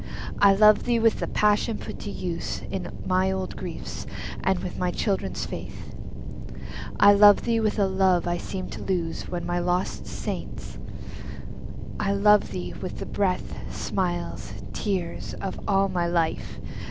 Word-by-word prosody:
I 200 -1 +7
love 210 +1 +6
thee 240 -1 +3
with 225 -1 +3
the - - -1
passion 210 +1 +2
put - - -7
to 205 - -5
use 175 -4 -3
In - - -3
my 185 +1 +3
old 190 -1 -3
griefs, - - -6 0.4
and 190 - +3
with 180 -1 -5
my 180 0 +1
childhood's 195 +2 -1
faith. - - -7 1.1
I 205 0 +9
love 205 0 +8
thee 230 -1 +2
with 215 -1 +1
a 200 - +4
love 190 -2 +3
I 175 0 +1
seemed 185 +1 -5
to - - -6
lose 170 -4 -1
With 175 -1 -3
my 175 0 0
lost 180 +1 0
saints,—I 200 -1 -6
love 210 +1 +5
thee 180 - -4
with 185 - -4
the - - -4
breath, 190 -3 0 0.2
Smiles, 175 -2 -2 0.2
tears, 185 -5 -2
of 195 - -4
all 195 -1 +4
my 180 -2 0
life! 170 -2 0
190 Hz, 155 wpm, -26 LUFS, 180-205 Hz, 1.1 s, I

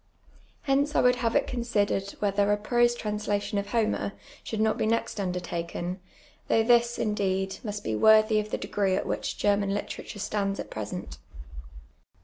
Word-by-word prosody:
Hence 285 +1 +1
I - - +5
would 250 0 +4
have 230 -1 0
it 285 - +3
considered 205 -5 -1
whether 200 0 +1
a 205 - +3
prose 240 +3 +2
translation 210 -2 -2
of 200 - -4
Homer 215 -3 0 0.3
should 220 - -4
not 220 0 +2
be - - +1
next 230 -1 -1
undertaken, 180 -1 -3 0.5
though 225 - +3
this, 240 0 +3
indeed, 195 -2 -1
must 205 -2 -4
be 110 - -1
worthy 215 - +5
of 210 0 -4
the - - -2
degree 195 -2 0
at - - -1
which - - -3
German 200 -1 +1
literature 205 - -6
stands 200 -1 -2
at - - -6
present. 95 -11 -6
205 Hz, 160 wpm, -27 LUFS, 195-225 Hz, 0.5 s, I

